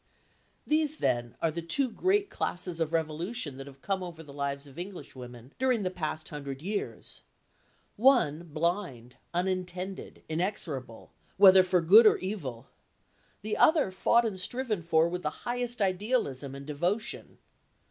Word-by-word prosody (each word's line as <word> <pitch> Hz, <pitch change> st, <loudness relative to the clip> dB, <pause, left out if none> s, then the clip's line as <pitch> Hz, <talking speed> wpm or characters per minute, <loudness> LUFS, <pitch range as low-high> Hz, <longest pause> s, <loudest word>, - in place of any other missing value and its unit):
These, 310 Hz, 0 st, +1 dB
then, 120 Hz, -1 st, 0 dB
are 165 Hz, -, +3 dB
the 170 Hz, +2 st, -4 dB
two 260 Hz, +12 st, 0 dB
great 385 Hz, -, +1 dB
classes 175 Hz, -1 st, -3 dB
of 165 Hz, -1 st, 0 dB
revolution 165 Hz, -, -2 dB
that 135 Hz, 0 st, -8 dB
have 135 Hz, -1 st, -14 dB
come 195 Hz, -1 st, -1 dB
over 170 Hz, -3 st, -7 dB
the 145 Hz, -2 st, -12 dB
lives 140 Hz, 0 st, -3 dB
of 140 Hz, +2 st, -12 dB
Englishwomen 130 Hz, -, -9 dB
during 250 Hz, -4 st, +2 dB
the 185 Hz, -, -1 dB
past 155 Hz, -3 st, -4 dB
hundred 140 Hz, -3 st, -6 dB
years. 200 Hz, +6 st, -5 dB, 0.8 s
One 205 Hz, -, +4 dB
blind, 155 Hz, -, -3 dB
unintended, 185 Hz, +1 st, -3 dB
inexorable, 155 Hz, -, -4 dB, 0.3 s
whether 190 Hz, -1 st, +9 dB
for 185 Hz, -1 st, +2 dB
good 210 Hz, +7 st, +8 dB
or -, -, +5 dB
evil; 145 Hz, -, -5 dB, 0.8 s
the 215 Hz, 0 st, -2 dB
other 305 Hz, -, +4 dB
fought 235 Hz, +5 st, +3 dB
and 190 Hz, -4 st, -3 dB
striven 240 Hz, -4 st, -2 dB
for 165 Hz, 0 st, +3 dB
with 180 Hz, +1 st, -4 dB
the 150 Hz, -, -1 dB, 0.2 s
highest 240 Hz, -2 st, -1 dB
idealism 185 Hz, -, -1 dB
and 140 Hz, 0 st, -9 dB
devotion. 175 Hz, +9 st, -3 dB
175 Hz, 145 wpm, -29 LUFS, 145-210 Hz, 0.8 s, whether